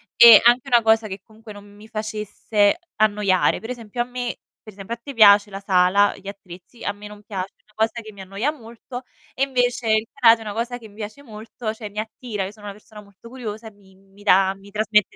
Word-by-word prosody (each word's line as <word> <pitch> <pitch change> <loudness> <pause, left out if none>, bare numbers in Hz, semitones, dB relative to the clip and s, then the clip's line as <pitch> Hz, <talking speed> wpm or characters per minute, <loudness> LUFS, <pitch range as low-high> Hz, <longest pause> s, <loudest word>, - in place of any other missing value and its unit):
e 235 -2 +10
anche 240 +1 +5
una 240 -2 +4
cosa 220 0 +3
che 190 -1 -8
comunque 220 -1 -14
non 205 0 -13
mi 205 +1 -16
facesse 215 - -1 0.2
annoiare. 205 -3 +2
Per 225 - -9
esempio 240 -1 -5
a - - 0
me 245 -1 -5 0.3
per 215 - -12
esempio 205 +4 -6
a - - -26
te 280 +3 -8
piace 205 -2 +6
la 195 0 -8
sala, 190 +1 +3
gli 195 0 -14
attrezzi, 195 +3 -11
a - - -1
me 205 +1 -11
non 210 0 -13
piace, 195 -2 -6
una 210 - -29
cosa 225 +2 -1
che 215 0 -11
mi 200 - -17
annoia 195 +9 -2
molto, 245 -1 -10 0.3
e 270 - 0
invece 245 -3 0
il 220 +1 +1
karate 230 -4 +5
è - - -7
una 210 - -5
cosa 240 +2 -3
che 225 -3 -13
mi 205 - -20
piace 215 +6 -8
molto, 220 -1 -7
cioè 220 -2 -8
mi 210 +1 -6
attira. 220 -2 -5
Io 195 - -7
sono 210 -1 -16
una 200 - -6
persona 210 0 -14
molto 200 +3 -17
curiosa 225 -3 -7
e - - -10
mi 195 -2 -23
mi 195 +1 -21
dà 190 0 +4
mi 195 +1 -16
trasmette 210 -1 +1
215 Hz, 235 wpm, -22 LUFS, 200-230 Hz, 0.3 s, e